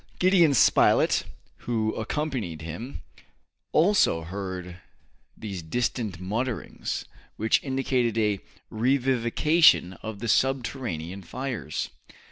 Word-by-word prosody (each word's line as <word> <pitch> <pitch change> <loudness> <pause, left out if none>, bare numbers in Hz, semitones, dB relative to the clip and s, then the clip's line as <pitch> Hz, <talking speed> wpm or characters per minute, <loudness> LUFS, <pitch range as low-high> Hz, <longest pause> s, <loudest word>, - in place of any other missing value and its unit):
Gideon 180 -6 +4
Spilett, - - +4 0.4
who 110 -2 0
accompanied 110 - -3
him, 105 - -7 0.7
also 165 - +3
heard 90 0 -6 0.6
these 100 -5 -6
distant 110 +1 -2
mutterings, 110 +6 -3 0.3
which 110 +1 +2
indicated 130 -4 0
a 105 -3 +1 0.3
revivification 130 - +3
of 110 -2 -6
the 120 +4 -5
subterranean 115 - -1
fires. 120 - -4
115 Hz, 90 wpm, -26 LUFS, 95-135 Hz, 0.7 s, Gideon